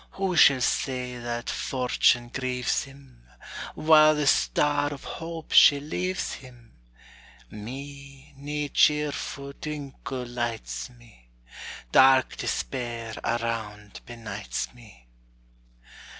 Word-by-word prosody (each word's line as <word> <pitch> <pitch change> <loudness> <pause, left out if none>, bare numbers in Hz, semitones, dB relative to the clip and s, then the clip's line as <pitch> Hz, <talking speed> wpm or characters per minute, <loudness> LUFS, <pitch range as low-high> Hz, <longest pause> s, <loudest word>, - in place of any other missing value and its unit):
Who 190 -2 -1
shall 140 -5 +6
say 125 0 -1
that 120 -1 -5
fortune 125 -2 +1
grieves 125 +1 -1
him, 135 - -17 0.5
While 155 -1 +6
the 150 -1 -1
star 145 +1 +2
of 140 - -8
hope 165 -1 -7
she 145 - +7
leaves 180 +6 -3
him? 120 -3 -13 0.8
Me, 140 +5 -10
nae 145 +1 -4
cheerfu' 145 -2 +1
twinkle 140 -4 -6
lights 115 - -4
me; 115 - -21 0.6
Dark 130 -1 +5
despair 120 -3 -4
around 110 -3 -3
benights 110 -4 -5
me. 110 - -17
130 Hz, 95 wpm, -26 LUFS, 120-145 Hz, 0.8 s, she